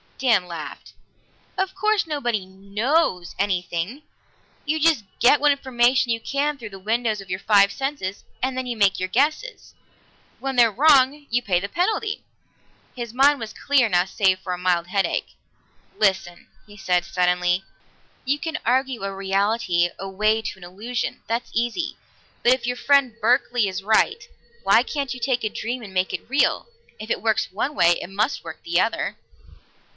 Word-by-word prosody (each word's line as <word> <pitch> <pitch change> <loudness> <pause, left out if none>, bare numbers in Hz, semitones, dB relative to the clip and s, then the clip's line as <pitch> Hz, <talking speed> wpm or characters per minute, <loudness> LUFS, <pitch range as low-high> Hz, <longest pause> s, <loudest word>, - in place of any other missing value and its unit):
Dan 230 -8 +2
laughed. 165 -3 -8 0.6
"Of 380 0 -1
course 425 -2 +1
nobody 240 - -2
knows 200 - -1
anything. 185 - -2 0.6
You 310 +2 0
just 310 -7 +3 0.2
get 255 +4 +5
what 295 +1 +4
information 250 -3 +2
you 230 - 0
can 285 +5 -1
through 225 -5 -8
the 195 -1 -11
windows 220 +1 -1
of 195 - -14
your 185 +1 -2
five 200 -1 +4
senses, 270 -7 -4 0.2
and 260 0 -1
then 260 0 -3
make 200 -2 +3
your 185 0 -2
guesses. 305 - -1 0.7
When 270 0 -3
they're 235 -2 +5
wrong, 285 +2 +4
you 245 +1 +2
pay 185 -6 +1
the 200 +2 -5
penalty." 420 - -1 0.7
His 235 -3 -6
mind 280 +2 +4
was 220 -2 -6
clear 270 -5 +2
now 180 -1 +3
save 190 -1 +1
for 185 -1 -4
a 180 - -5
mild 175 -2 +1
headache. 195 +1 -1 0.6
"Listen," 190 -4 0 0.2
he 205 0 -14
said 180 -2 +1
suddenly. 180 0 +1 0.6
"You 275 +2 0
can 325 -1 -3
argue 255 -1 0
a 195 0 -3
reality 195 -2 +1
away 210 +3 0
to - - -5
an - - -13
illusion; 215 +7 -4
that's 230 +2 -2
easy. 240 +9 -1 0.5
But 245 - +6
if 250 -2 -3
your 245 0 -1
friend 275 -4 +3
Berkeley 245 -1 +2
is 190 0 -4
right, 220 - +2 0.4
why - - +5
can't 275 -4 -3
you - - -9
take 245 0 0
a 215 - 0
dream 240 +4 -4
and 200 -4 -10
make 185 0 0
it - - -6
real? 275 - +2 0.3
If 215 +1 -8
it - - -1
works 220 -2 +1
one 250 +10 -2
way, 170 -6 +4
it - - -7
must 210 +7 -1
work - - -9
the 340 - +1
other." - - -1
230 Hz, 170 wpm, -23 LUFS, 190-270 Hz, 0.7 s, But